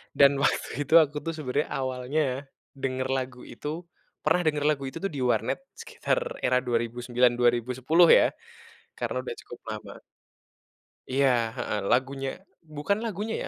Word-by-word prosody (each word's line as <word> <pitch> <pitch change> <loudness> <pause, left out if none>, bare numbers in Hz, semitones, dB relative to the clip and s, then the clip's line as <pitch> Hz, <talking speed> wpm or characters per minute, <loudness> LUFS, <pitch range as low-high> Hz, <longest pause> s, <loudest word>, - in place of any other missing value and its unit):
dan 140 0 +7
waktu 145 - +1 0.2
itu - - -2
aku 150 0 -6
tuh 165 - -2
sebenarnya 145 -1 -1
awalnya 130 +3 -1 0.6
denger 130 -1 -1
lagu 125 -1 -5
itu 120 +4 -9 0.6
pernah 165 +4 +3
denger 150 -1 +1
lagu 140 -2 0
itu - - -6
tuh 195 - -1
di - - -3
warnet, - - +1 0.2
sekitar - - -1 0.3
era 125 - +3
2009, 120 +1 +1
2010, 125 +7 +3
ya, - - +4 0.7
karena - - -2
udah 120 - -5
cukup 120 - -11
lama. 110 - -7 1.2
Iya, 135 0 +4 0.3
heeh, 105 - -2
lagunya 135 +2 +1 0.5
bukan 200 +8 0
lagunya, 215 +1 -3
130 Hz, 140 wpm, -27 LUFS, 125-150 Hz, 1.2 s, dan